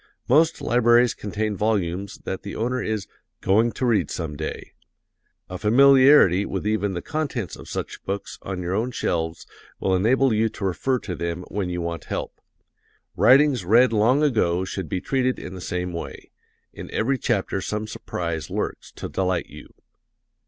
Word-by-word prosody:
Most 155 +5 +3
libraries 120 0 +4
contain 105 +1 -3
volumes 100 -2 -1
that 95 - -4
the 100 - -7
owner 125 +3 -1
is 110 -2 -2 0.3
"going 110 +5 +3
to 130 - -2
read 115 -4 +2
some 80 -4 -4
day." 75 +1 -6 0.7
A 90 0 -7
familiarity 130 - +6
with - - -4
even 105 -2 0
the 85 - -4
contents 140 - -3
of - - -12
such - - -5
books 100 +1 -5
on 95 -2 -5
your 90 +1 -2
own 110 +5 0
shelves 85 -9 -2 0.3
will 95 - +1
enable 125 +6 +3
you 110 +1 +2
to 100 - -6
refer 125 +8 0
to 100 -6 -6
them 85 +1 -4
when 100 -3 -2
you 90 0 -3
want 85 0 -4
help. - - -5 0.7
Writings 135 -4 +5
read 115 +6 +4
long 120 +7 +3
ago 95 - +1
should 95 -3 -5
be 90 - -2
treated 130 -1 0
in 95 - -8
the 95 - -8
same 90 0 -3
way 85 - -7 0.4
in - - -9
every 130 +4 0
chapter 100 -4 -1
some 105 +2 -3
surprise 85 -6 -5
lurks - - -4
to - - -6
delight 90 -2 -1
you. - - -12
105 Hz, 165 wpm, -23 LUFS, 90-125 Hz, 0.7 s, familiarity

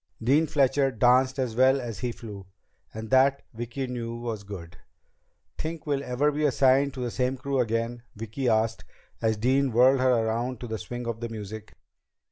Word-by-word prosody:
Dean 140 +8 +3
Fletcher 135 -2 +2
danced 130 +3 +3
as 125 -4 -2
well 130 +2 +4
as 115 -5 -6
he 125 -1 -2
flew. 105 -5 -9 0.4
And 110 +1 -7
that, 135 +1 +4
Vicki 120 +4 -4
knew, 120 -2 -4
was 115 -3 -4
good. 90 -5 -9 0.8
"Think 160 0 -4
we'll 140 -2 -1
ever 140 +4 +1
be 150 +1 -2
assigned 135 0 +3
to 130 - -5
the 120 -1 -2
same 125 +2 -1
crew 135 +1 -2
again?" 115 0 -1
Vicki 115 +4 -2
asked, 110 0 +1 0.4
as 110 -1 +1
Dean 130 +4 +2
whirled 130 +3 +5
her 125 -3 +3
around 120 +2 -2
to 120 - -5
the 110 -1 -4
swing 120 +2 -6
of 115 -1 -3
the 120 0 -4
music. 110 -1 -8
125 Hz, 180 wpm, -27 LUFS, 115-135 Hz, 0.8 s, whirled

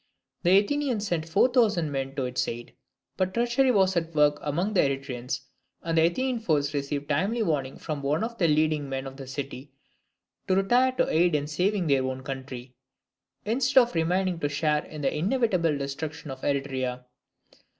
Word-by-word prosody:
The 185 +2 +5
Athenians 245 0 0
sent 165 -3 -2
four 195 +9 +4
thousand 210 - +2
men 135 0 -3
to 135 -2 -1
its 125 0 -1
aid. 120 0 -6 0.4
But 185 0 -1
treachery 240 +3 +2
was 190 -5 +3
at 165 -1 -2
work 150 -1 +4
among 175 +8 -1
the 190 - +2
Eretrians; 135 -3 -2 0.4
and 165 -1 -1
the 160 0 +5
Athenian 255 +7 -1
force 150 -8 0
received 145 0 -3
timely 195 +10 0
warning 140 -7 -1
from 150 -3 -5
one 145 +7 0
of 230 +1 -5
the 170 - +4
leading 155 -2 +1
men 135 0 -3
of 135 0 -8
the 135 -2 -8
city 140 0 -6 0.8
to 185 - +3
retire 245 +7 +3
to - - +1
aid 170 0 +3
in 145 -1 0
saving 180 +5 0
their 140 -3 +2
own 130 0 -4
country, 130 -2 -7 0.7
instead 255 +4 +4
of 240 - -1
remaining 180 +2 0
to 145 - -1
share 150 +1 0
in 155 -1 -9
the 135 - 0
inevitable 180 - +1
destruction 145 +2 -5
of 130 0 -8
Eretria. 130 -3 -2
155 Hz, 180 wpm, -27 LUFS, 140-195 Hz, 0.8 s, The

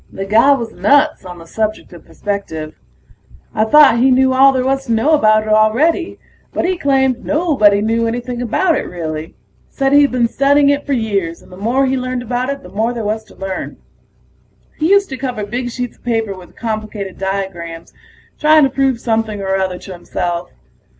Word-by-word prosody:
The 195 - -5
guy 225 +8 +5
was 235 -4 -3
nuts 290 -2 +2
on 180 -1 -9
the 165 - -12
subject 215 +2 -3
of 170 - -14
perspective. 160 -7 -5 0.8
I 215 - +1
thought 275 -1 +6
he 260 +2 +4
knew 260 0 +3
all 270 +1 +6
there 260 -1 -1
was 270 0 0
to - - -2
know 230 +8 +2
about 215 -7 +4
it 215 - -6
already, 235 - +2 0.3
but - - -2
he 370 +1 +1
claimed 265 -5 +1
nobody 285 - +2
knew 230 +2 0
anything 245 +1 -4
about 325 - +1
it, - - -3
really. 160 -2 -6 0.3
Said 270 0 0
he'd 285 -1 +5
been 245 -2 +1
studying 280 +3 +3
it 285 +1 -2
for 285 - 0
years, 200 -8 -2
and - - -19
the - - -10
more 235 +8 0
he 265 0 0
learned 255 -1 -3
about 245 +2 -2
it 280 0 -4
the - - -11
more 225 +3 -1
there 230 -3 -5
was 220 +1 -2
to 215 - -19
learn. 195 -1 -5 1.0
He 315 +2 +1
used 400 0 +4
to 265 - -5
cover 250 -5 -4
big 245 +4 -4
sheets 245 0 -5
of - - -32
paper 225 -4 -1
with 185 -1 -14
complicated 215 -4 -5
diagrams 190 -4 -5 0.5
trying 310 0 +5
to 270 - +2
prove 270 -3 0
something 225 -3 -1
or 190 -1 -1
other 190 -1 -1
to 190 - -10
himself. 175 -1 -4
230 Hz, 195 wpm, -16 LUFS, 200-270 Hz, 1.0 s, thought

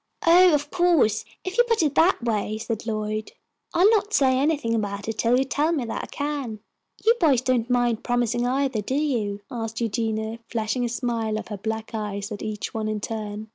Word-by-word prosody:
"Oh, 355 +2 +7
of 290 0 -3
course, 345 - +3 0.2
if 375 +5 -4
you - - +8
put 460 -7 +2
it 295 -2 +1
that 330 -4 +3
way," 215 -2 -1
said 225 0 -4
Lloyd, 215 0 -3 0.4
"I'll 360 +4 +5
not 425 -1 +1
say 260 -2 +4
anything 285 -5 +1
about 205 -2 -2
it 225 -1 -4
till 235 +2 +3
you 265 - +3
tell 295 +5 +1
me 290 -7 -1
that 230 - -4
I - - -14
can." 285 -6 -3 0.5
"You 455 - +7
boys 280 -7 +4
don't 255 -2 0
mind 245 -2 +1
promising, 240 -1 0
either, 265 -3 0
do 255 +6 -3
you?" 230 -9 -1
asked 225 -2 -4
Eugenia, 225 0 -2
flashing 225 +2 -1
a 240 - 0
smile 230 -3 -1
of 220 - -7
her 210 - -4
black 220 +2 -4
eyes 205 -1 -4
at 205 - -5
each 215 -1 -4
one 220 -1 -2
in 215 -1 -2
turn. 215 -1 -5
235 Hz, 205 wpm, -24 LUFS, 215-280 Hz, 0.5 s, you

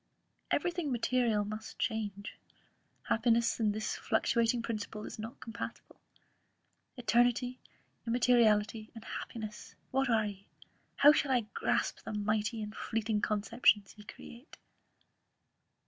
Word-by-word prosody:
Every 355 - +1
thing 340 -5 -3
material 235 -3 +1
must 215 +2 -7
change; 205 -2 -3 0.7
happiness 230 +1 +2
and 215 -2 +2
this 215 +1 -2
fluctating 230 +1 +1
principle 215 -2 -4
is - - -8
not 225 +3 -7
compatible. 230 -1 -8 1.0
Eternity, 245 +1 +2 0.5
immateriality, 225 -3 +3
and 225 -1 -10
happiness, 215 -2 -7 0.2
what 270 0 +1
are 220 -2 +3
ye? 200 -1 -7 0.5
How 290 - +8
shall 290 - +1
I 255 -2 +3
grasp - - 0
the - - -7
mighty 215 +2 -1
and 210 0 -7
fleeting 220 -2 -1
conceptions 210 -1 +2
ye 210 - -13
create?" 235 +5 -12
225 Hz, 115 wpm, -32 LUFS, 210-240 Hz, 1.0 s, How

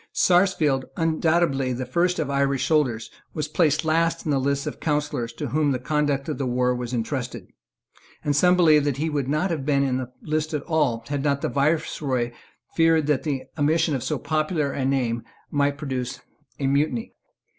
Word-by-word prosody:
Sarsfield, 175 -7 +3
undoubtedly 160 -5 +1
the 125 +1 -3
first 175 +7 +1
of 155 - -1
Irish 140 -1 +1
soldiers, 130 -8 +1 0.2
was 155 -2 -2
placed 155 0 +1
last 165 +1 +1
in 155 - 0
the 140 - +2
list 140 +1 0
of - - -3
the - - -23
councillors 150 -6 -1
to - - -5
whom 150 0 +1
the 130 - 0
conduct 145 +1 0
of 155 - -3
the 135 - -1
war 125 0 +1
was 125 -1 -4
entrusted; 125 +1 -3 0.8
and 145 -1 +1
some 180 +5 +5
believed 155 -4 +5
that 140 -3 0
he 155 +2 -1
would 140 -3 -1
not 155 +6 +1
have 155 -5 -2
been 140 -1 +2
in 130 -2 0
the 130 -1 -5
list 155 0 -1
at 145 - -3
all, 140 -9 0
had 145 -1 -2
not 140 -1 +1
the - - -1
Viceroy 140 -4 0 0.4
feared 165 -2 +4
that 150 -3 +1
the 140 -4 -2 0.2
omission 155 +2 +2
of 130 - -1
so - - -1
popular 155 -2 -1
a 135 -1 -2
name 125 -4 0 0.3
might 145 -1 +1
produce 130 -4 -4 0.4
a 140 - -1
mutiny. 150 - 0
145 Hz, 190 wpm, -24 LUFS, 135-155 Hz, 0.8 s, some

